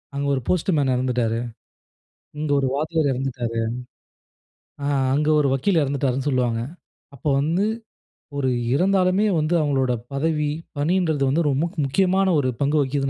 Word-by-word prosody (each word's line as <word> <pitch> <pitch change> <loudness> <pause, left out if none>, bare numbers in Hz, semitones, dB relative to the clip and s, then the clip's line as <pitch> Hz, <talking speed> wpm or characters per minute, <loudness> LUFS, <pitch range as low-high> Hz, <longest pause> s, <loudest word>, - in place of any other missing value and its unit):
அங்க 140 0 -1
ஒரு 130 - -2
post 180 +1 +1
man 135 -3 +2
இறந்துட்டாரு. 125 -3 0 1.0
இங்க 155 -1 -2
ஒரு 135 - 0
வாத்தியார் 155 +1 0
இறந்துட்டாரு. 125 -3 -3 1.2
ஆ - - -1 0.3
அங்க 150 +2 +1
ஒரு 140 - +2
வக்கீல் 165 +6 +2
இறந்துட்டாருனு, 135 -1 -1
சொல்லுவாங்க. 125 -4 0 0.6
அப்போ 140 +3 -3
வந்து 170 +7 +1 0.7
ஒரு 130 -2 +1 0.2
இறந்தாலுமே 185 +4 +2
வந்து 155 +2 0
அவங்களோட 135 -4 +1 0.2
பதவி, 150 +1 0 0.3
பணின்றது 160 -2 +1
வந்து 160 +5 +2
ரொம்ப 135 -1 +1
முக் 175 +2 -6
முக்கியமான 190 +6 +2
ஒரு 130 - 0
பங்கு 145 +2 +2
வகிக்கிது 135 0 0
145 Hz, 140 wpm, -23 LUFS, 130-165 Hz, 1.2 s, man